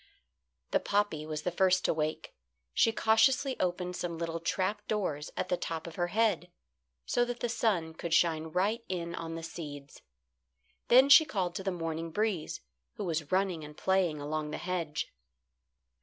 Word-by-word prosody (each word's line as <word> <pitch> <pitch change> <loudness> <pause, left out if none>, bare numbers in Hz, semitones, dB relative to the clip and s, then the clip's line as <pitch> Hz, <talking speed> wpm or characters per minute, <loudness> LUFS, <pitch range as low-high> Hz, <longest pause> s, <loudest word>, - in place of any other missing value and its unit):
The - - +3
poppy 200 -7 0
was 155 -1 -4
the 180 - 0
first 185 +1 +3
to - - +3
wake. 155 0 -3 0.4
She 225 - +4
cautiously 255 +5 +3
opened 180 0 -1
some 170 -2 -3
little 165 0 -3
trap 195 +5 -1
doors 180 -9 -1
at - - -2
the 180 - +1
top 165 -2 -4
of 170 - -7
her 175 +1 -1
head, 200 -3 +1 0.6
so 245 - +2
that 245 0 -3
the 240 - 0
sun 215 -9 0
could 165 +1 -6
shine 160 -1 +3
right 195 +8 0
in 170 -2 -3
on 165 -1 -5
the 165 - -6
seeds. 145 -4 -8 0.9
Then 260 +3 +7
she 280 +3 +9
called 190 - -2
to 190 - -5
the 195 - 0
morning 165 -1 -3
breeze, 200 -2 -1 0.3
who - - -4
was 160 -5 -2
running 185 -4 +1
and 150 0 -10
playing 185 -5 +1
along 150 +1 -3
the 155 - -4
hedge. 170 -4 -3
175 Hz, 170 wpm, -31 LUFS, 160-205 Hz, 0.9 s, she